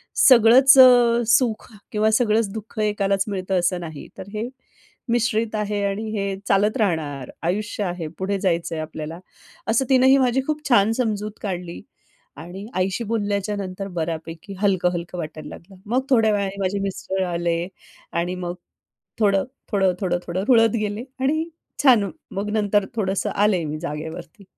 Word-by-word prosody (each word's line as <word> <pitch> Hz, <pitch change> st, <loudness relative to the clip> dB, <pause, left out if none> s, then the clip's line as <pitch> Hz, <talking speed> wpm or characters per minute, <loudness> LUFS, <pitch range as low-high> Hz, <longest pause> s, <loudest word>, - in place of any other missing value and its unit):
सगळंच 255 Hz, +2 st, +7 dB
अ, 245 Hz, -2 st, +7 dB
सुख 235 Hz, -2 st, +2 dB, 0.2 s
किंवा 215 Hz, +1 st, +2 dB
सगळंच 220 Hz, -2 st, +2 dB
दुःख 220 Hz, 0 st, -8 dB
एकालाच 200 Hz, -2 st, +1 dB
मिळतं 190 Hz, -2 st, -1 dB
असं 175 Hz, +1 st, 0 dB
नाही. 160 Hz, -3 st, -8 dB
तर 190 Hz, -, -8 dB
हे 215 Hz, +3 st, -3 dB, 0.6 s
मिश्रित 230 Hz, -1 st, 0 dB
आहे 210 Hz, -1 st, -1 dB
आणि 200 Hz, +2 st, -2 dB
हे 195 Hz, -1 st, -2 dB
चालत 205 Hz, +4 st, +2 dB
राहणार. 155 Hz, -, -1 dB
आयुष्य 205 Hz, +4 st, -2 dB
आहे 175 Hz, -3 st, -3 dB
पुढे 195 Hz, +1 st, -1 dB
जायचंय 170 Hz, -3 st, -1 dB
आपल्याला." 155 Hz, +1 st, -6 dB, 0.5 s
असं 235 Hz, +4 st, +2 dB
तिनं 260 Hz, -1 st, +5 dB
ही 270 Hz, +1 st, +6 dB
माझी 260 Hz, 0 st, +2 dB
खूप 305 Hz, -1 st, -3 dB
छान 225 Hz, -3 st, +5 dB
समजूत 210 Hz, -3 st, -1 dB
काढली 180 Hz, -4 st, -5 dB, 0.6 s
आणि 185 Hz, +4 st, -8 dB
आईशी 190 Hz, +5 st, 0 dB
बोलल्याच्या 205 Hz, -2 st, -1 dB
नंतर 195 Hz, 0 st, -5 dB
बऱ्यापैकी 165 Hz, +3 st, -5 dB
हलकं-हलकं 180 Hz, -3 st, 0 dB
वाटायला 155 Hz, -2 st, -7 dB
लागलं. 190 Hz, +3 st, -12 dB
मग 245 Hz, +5 st, +1 dB
थोड्या 225 Hz, -3 st, +4 dB
वेळाने 200 Hz, -1 st, -2 dB
माझे 195 Hz, +1 st, -1 dB
मिस्टर 190 Hz, -1 st, -2 dB
आले 170 Hz, 0 st, -1 dB, 0.5 s
आणि 175 Hz, +2 st, -1 dB
मग 175 Hz, -1 st, -4 dB, 0.6 s
थोडं, 200 Hz, -3 st, +3 dB, 0.3 s
थोडं, 195 Hz, -3 st, +2 dB
थोडं, 175 Hz, -2 st, 0 dB
थोडं 185 Hz, +2 st, -2 dB
रुळत 230 Hz, -3 st, +6 dB
गेले 210 Hz, +2 st, -3 dB, 0.2 s
आणि 310 Hz, +4 st, +1 dB, 0.4 s
छान 230 Hz, -8 st, +5 dB, 0.2 s
मग 200 Hz, +2 st, -3 dB
नंतर 205 Hz, -2 st, +2 dB
थोडंसं 195 Hz, -3 st, -1 dB
आले 200 Hz, -4 st, +2 dB
मी 150 Hz, 0 st, -4 dB
जागेवरती 160 Hz, +3 st, -7 dB
200 Hz, 150 wpm, -22 LUFS, 180-220 Hz, 0.6 s, सगळंच